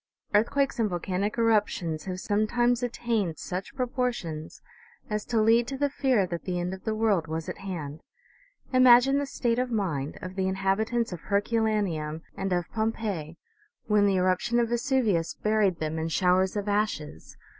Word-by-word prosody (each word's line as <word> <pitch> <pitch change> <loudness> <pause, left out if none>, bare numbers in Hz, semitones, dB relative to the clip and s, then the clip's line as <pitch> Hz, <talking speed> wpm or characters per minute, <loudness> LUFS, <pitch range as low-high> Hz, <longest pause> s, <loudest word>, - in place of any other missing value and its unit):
Earthquakes 270 +6 +2
and 220 -2 +2
volcanic 185 +4 -2
eruptions 205 -8 +1
have 185 -1 -4
sometimes 240 +5 +1
at 245 -1 -1
tained 210 -9 -1
such 190 +7 -5
proportions 240 - -3 0.5
as 210 0 -1
to 230 -2 0
lead 230 +2 +4
to 270 - -4
the 285 0 0
fear 260 -8 +2
that 170 -2 -5
the 180 -1 -2
end 175 +1 -2
of 190 - -10
the 220 -1 0
world 210 -7 +1
was 160 +1 -4
at - - -6
hand. 160 -6 -6 0.7
Imagine 255 +2 +6
the 285 - -2
state 240 -3 0
of 250 0 0
mind 165 - -2
of 185 0 -7
the 190 -1 0
inhabitants 195 +4 0
of 170 - -7
Herculaneum 200 -7 0
and 195 0 -3
of 175 -2 0
Pompeii 215 -8 -2 0.5
when 210 -1 +3
the 195 - +2
eruption 185 +7 +1
of 235 -1 +1
Vesuvius 235 - +1
buried 210 -4 +1
them 160 0 -3
in 160 - -2
showers 185 +3 +2
of 205 0 -3
ashes 205 - -2
205 Hz, 165 wpm, -27 LUFS, 180-235 Hz, 0.7 s, Imagine